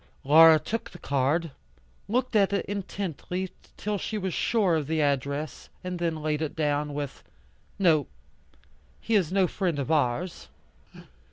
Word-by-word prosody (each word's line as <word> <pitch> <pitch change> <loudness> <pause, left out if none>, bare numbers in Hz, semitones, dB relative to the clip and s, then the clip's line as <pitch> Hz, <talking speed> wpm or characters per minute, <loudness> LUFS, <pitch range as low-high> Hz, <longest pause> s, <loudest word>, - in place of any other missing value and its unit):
Laura 160 +3 +8
took 225 +8 -4
the 175 - -12
card, 145 +3 0 0.6
looked 245 +2 0
at 200 -2 +4
it 200 - 0
intently 190 -2 -4 0.3
till 210 -1 -2
she 215 - -3
was 190 -3 -2
sure 210 -7 +2
of 150 -3 -1
the 160 0 0
address, 140 +1 -1
and 180 -1 -4
then 165 -3 -2
laid 155 0 0
it 155 - -3
down, 150 -1 0
with, 145 -2 -5 0.5
"No, 160 -7 +3 0.9
he 230 - -3
is 185 -6 +3
no 190 -1 +3
friend 180 -3 -1
of 140 +2 -2
ours." 155 +4 0
165 Hz, 150 wpm, -27 LUFS, 150-190 Hz, 0.9 s, Laura